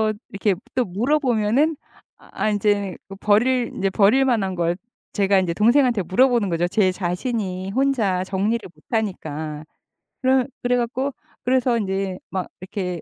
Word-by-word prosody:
그래서 215 Hz, 0 st, +2 dB, 0.2 s
이렇게 200 Hz, 0 st, +1 dB, 0.2 s
또 255 Hz, -1 st, +2 dB
물어보면은 250 Hz, -, +1 dB, 0.4 s
아 -, -, -4 dB
인제 205 Hz, -2 st, 0 dB
그 195 Hz, -, -8 dB
버릴 235 Hz, +5 st, +2 dB
인제 195 Hz, 0 st, 0 dB
버릴 215 Hz, +8 st, +4 dB
만한 205 Hz, -8 st, 0 dB
걸 170 Hz, 0 st, 0 dB, 0.4 s
제가 200 Hz, -1 st, +3 dB
인제 180 Hz, -3 st, 0 dB
동생한테 235 Hz, +1 st, +3 dB
물어보는 235 Hz, +3 st, +3 dB
거죠 170 Hz, 0 st, +1 dB
제 190 Hz, +1 st, +2 dB
자신이 185 Hz, +1 st, -3 dB
혼자 225 Hz, -7 st, +1 dB
정리를 200 Hz, +4 st, -1 dB
못 150 Hz, -, -24 dB
하니까. 155 Hz, -9 st, -3 dB, 0.6 s
그럼 260 Hz, -1 st, +3 dB, 0.2 s
그래 245 Hz, 0 st, +2 dB
갖고 255 Hz, +3 st, -1 dB, 0.3 s
그래서 250 Hz, -1 st, +2 dB
인제 195 Hz, -3 st, -2 dB
막 185 Hz, -1 st, -2 dB
이렇게 185 Hz, -2 st, -4 dB
205 Hz, 310 characters per minute, -22 LUFS, 185-245 Hz, 0.6 s, 버릴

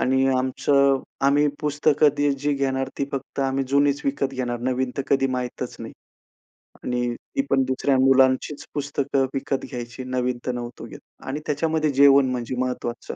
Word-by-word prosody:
आणि 130 Hz, +1 st, +2 dB
आमचं 135 Hz, +1 st, +2 dB, 0.3 s
आम्ही 145 Hz, +1 st, +4 dB
पुस्तकं 150 Hz, 0 st, +3 dB
दि 145 Hz, 0 st, +2 dB
जी 145 Hz, +1 st, +1 dB
घेणार 135 Hz, -1 st, -1 dB
ती 140 Hz, -, +1 dB
फक्त 135 Hz, 0 st, -4 dB
आम्ही 135 Hz, 0 st, 0 dB
जुनीच 140 Hz, +1 st, +2 dB
विकत 140 Hz, 0 st, 0 dB
घेणार. 120 Hz, -2 st, -2 dB
नवीन 130 Hz, +1 st, -1 dB
तर 140 Hz, -, -1 dB
कधी 135 Hz, -1 st, +3 dB
माहीतच 125 Hz, -1 st, -4 dB
नाही -, -, -7 dB, 0.9 s
आणि 120 Hz, -1 st, -1 dB
ती 275 Hz, -, -4 dB
पण 135 Hz, -, +3 dB
दुसऱ्या 130 Hz, +1 st, +1 dB
मुलांचीच 130 Hz, +2 st, +3 dB
पुस्तकं 140 Hz, -1 st, 0 dB
विकत 135 Hz, 0 st, -2 dB
घ्यायची. 120 Hz, -1 st, -6 dB
नवीन 125 Hz, -1 st, -1 dB
तर -, -, +2 dB
नव्हतो 120 Hz, -1 st, -6 dB
घेत. 115 Hz, -, -11 dB, 0.2 s
आणि 135 Hz, +3 st, -4 dB
त्याच्यामध्ये 155 Hz, +1 st, 0 dB
जेवण 140 Hz, -1 st, +6 dB
म्हणजे 125 Hz, 0 st, -3 dB
महत्त्वाचं. 125 Hz, -2 st, -3 dB
135 Hz, 160 wpm, -23 LUFS, 130-140 Hz, 0.9 s, जेवण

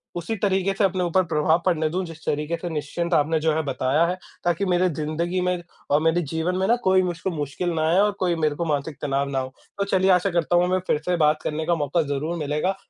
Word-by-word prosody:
उसी 175 Hz, +6 st, -3 dB
तरीके 195 Hz, 0 st, +2 dB
से 205 Hz, -, 0 dB
अपने 185 Hz, -1 st, +1 dB
ऊपर 185 Hz, +2 st, +2 dB
प्रभाव 160 Hz, +2 st, +2 dB
पड़ने 160 Hz, -4 st, +2 dB
दूँ, 185 Hz, +3 st, -2 dB
जिस 165 Hz, -1 st, -11 dB
तरीके 150 Hz, +3 st, -1 dB
से 175 Hz, -, -5 dB
निश्चिंत 165 Hz, +3 st, -3 dB
आपने 155 Hz, +1 st, +2 dB
जो 160 Hz, 0 st, +1 dB
है 160 Hz, -, +1 dB
बताया 135 Hz, +3 st, +1 dB
है, 180 Hz, -, -1 dB, 0.3 s
ताकि 175 Hz, +3 st, +1 dB
मेरे 180 Hz, 0 st, +2 dB
जिंदगी 165 Hz, +4 st, -2 dB
में 180 Hz, 0 st, 0 dB, 0.3 s
और 145 Hz, +2 st, +4 dB
मेरे 165 Hz, +2 st, +2 dB
जीवन 160 Hz, +3 st, -2 dB
में 190 Hz, -, +1 dB
ना 235 Hz, -, +4 dB
कोई 190 Hz, 0 st, +4 dB
मुझको 175 Hz, +1 st, -2 dB
मुश्किल 150 Hz, +3 st, -3 dB
ना 160 Hz, 0 st, 0 dB
आए 175 Hz, +3 st, +4 dB
और 210 Hz, +1 st, +4 dB
कोई 180 Hz, -2 st, +1 dB
मेरे 155 Hz, -2 st, 0 dB
को 170 Hz, +2 st, -2 dB
मानसिक 145 Hz, -1 st, -2 dB
तनाव 140 Hz, 0 st, -1 dB
ना 135 Hz, -, -1 dB
हो। 130 Hz, 0 st, -5 dB, 0.2 s
तो 200 Hz, -, +1 dB
चलिए 190 Hz, -1 st, +2 dB
आशा 180 Hz, +2 st, +3 dB
करता 170 Hz, 0 st, +1 dB
हूँ 175 Hz, -, +5 dB
हमें 185 Hz, +1 st, +1 dB
फिर -, -, +2 dB
से 180 Hz, 0 st, +1 dB
बात 150 Hz, +1 st, +2 dB
करने 155 Hz, +1 st, -2 dB
का 170 Hz, -, +2 dB
मौका 150 Hz, +2 st, 0 dB
ज़रूर 155 Hz, +5 st, -2 dB
मिलेगा 150 Hz, +5 st, -1 dB
170 Hz, 245 wpm, -24 LUFS, 150-180 Hz, 0.3 s, हूँ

